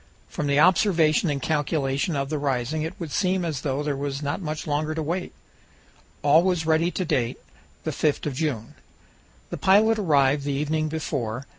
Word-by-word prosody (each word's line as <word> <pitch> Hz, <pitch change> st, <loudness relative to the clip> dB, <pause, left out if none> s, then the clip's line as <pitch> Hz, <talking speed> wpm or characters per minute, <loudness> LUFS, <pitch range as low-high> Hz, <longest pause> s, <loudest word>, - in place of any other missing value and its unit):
From 150 Hz, -, -4 dB
the 140 Hz, 0 st, +2 dB
observation 170 Hz, -2 st, +4 dB
and 145 Hz, -1 st, -1 dB
calculation 145 Hz, +1 st, -1 dB
of 140 Hz, 0 st, -2 dB
the 155 Hz, -, -1 dB
rising 140 Hz, +2 st, -1 dB
it 160 Hz, +3 st, -5 dB
would 165 Hz, -4 st, -6 dB
seem 185 Hz, +1 st, 0 dB
as 150 Hz, -5 st, -3 dB
though 140 Hz, 0 st, -2 dB
there 145 Hz, -1 st, -1 dB
was 140 Hz, +1 st, -4 dB
not 145 Hz, +6 st, -2 dB
much 155 Hz, -2 st, -4 dB
longer 155 Hz, +1 st, -1 dB
to 160 Hz, -, -2 dB
wait. 175 Hz, +4 st, -3 dB, 0.9 s
All 150 Hz, +3 st, +6 dB
was 180 Hz, -3 st, 0 dB
ready 160 Hz, +2 st, +2 dB
to 185 Hz, +1 st, -3 dB
date, 120 Hz, -6 st, 0 dB, 0.5 s
the -, -, -2 dB
5th 150 Hz, -2 st, 0 dB
of 150 Hz, -, -2 dB
June. 130 Hz, -6 st, -3 dB, 0.8 s
The -, -, -3 dB
pilot 215 Hz, +3 st, +4 dB
arrived 145 Hz, -6 st, +3 dB
the 140 Hz, 0 st, -2 dB
evening 155 Hz, +2 st, -1 dB
before. 135 Hz, -6 st, -3 dB
150 Hz, 180 wpm, -24 LUFS, 140-165 Hz, 0.9 s, All